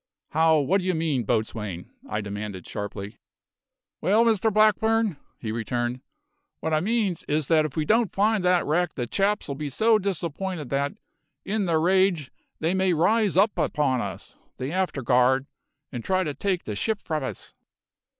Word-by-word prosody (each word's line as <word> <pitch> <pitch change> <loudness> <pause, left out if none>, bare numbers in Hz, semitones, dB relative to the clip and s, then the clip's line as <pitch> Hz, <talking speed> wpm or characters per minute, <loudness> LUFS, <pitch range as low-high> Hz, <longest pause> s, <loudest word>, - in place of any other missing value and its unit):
"How 160 0 +4
what 170 +7 +2
do 185 - -4
you 185 - +1
mean, 155 -7 0
boatswain?" 105 -5 -2 0.2
I 105 - -1
demanded 100 -2 -6
sharply. 105 0 -6 0.8
"Well, 215 +5 +4
Mr 220 -1 +2
Blackburn," 215 -2 +3 0.2
he 110 - -5
returned, 120 +2 -2 0.6
"what 160 - -2
I 155 - +4
means 205 -2 0
is 150 0 +1
that 155 -2 +4
if 150 -1 -6
we 155 - +1
don't 225 +3 +2
find 210 0 +2
the 180 -1 +3
wrack 170 +2 0
the 125 - -2
chaps'll 195 - 0
be 145 +1 -4
so 220 - +3
disapp'inted 180 -4 -3
that, 140 +1 0 0.5
in 205 0 0
their 165 -2 +2
rage, 180 -4 +2 0.3
they 165 +3 0
may 190 -1 +2
rise 200 +4 +2
upon 150 - +2
us, - - -7 0.2
the 130 +3 -4
afterguard, 130 -7 +2 0.5
and 120 -4 -5
try 185 0 +1
to 150 -4 -3
take 185 +5 -1
the 105 - -4
ship 215 - -1
from 155 -3 -2
us." 130 - -7
160 Hz, 160 wpm, -25 LUFS, 130-195 Hz, 0.8 s, How